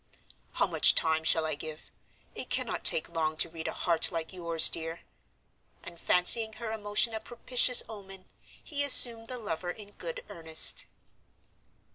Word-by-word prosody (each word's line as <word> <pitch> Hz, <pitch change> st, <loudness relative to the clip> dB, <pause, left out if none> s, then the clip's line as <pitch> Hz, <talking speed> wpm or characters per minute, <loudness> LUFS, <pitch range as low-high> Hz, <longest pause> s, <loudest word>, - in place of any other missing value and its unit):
"How -, -, 0 dB
much -, -, +3 dB
time 160 Hz, 0 st, +1 dB
shall 160 Hz, 0 st, +1 dB
I 155 Hz, -, -3 dB
give? 155 Hz, +1 st, -9 dB, 0.4 s
It -, -, -8 dB
cannot -, -, -4 dB
take 155 Hz, -, +1 dB
long 160 Hz, -2 st, -4 dB
to 170 Hz, -, +2 dB
read 160 Hz, -1 st, -9 dB
a -, -, -4 dB
heart 170 Hz, 0 st, 0 dB
like 165 Hz, +1 st, -6 dB
yours, 170 Hz, -3 st, +4 dB
dear." 165 Hz, 0 st, -4 dB, 0.8 s
And 170 Hz, -1 st, -12 dB
fancying 220 Hz, +5 st, +3 dB
her 220 Hz, 0 st, -8 dB
emotion 215 Hz, +1 st, -1 dB
a 220 Hz, -, -5 dB
propitious 245 Hz, +2 st, 0 dB
omen, 195 Hz, -3 st, -12 dB, 0.4 s
he 285 Hz, -3 st, -4 dB
assumed 235 Hz, -5 st, +6 dB
the 255 Hz, -, -5 dB
lover 180 Hz, -6 st, -7 dB
in 205 Hz, +2 st, -10 dB
good -, -, -9 dB
earnest. 160 Hz, -1 st, 0 dB
180 Hz, 155 wpm, -27 LUFS, 160-225 Hz, 0.8 s, assumed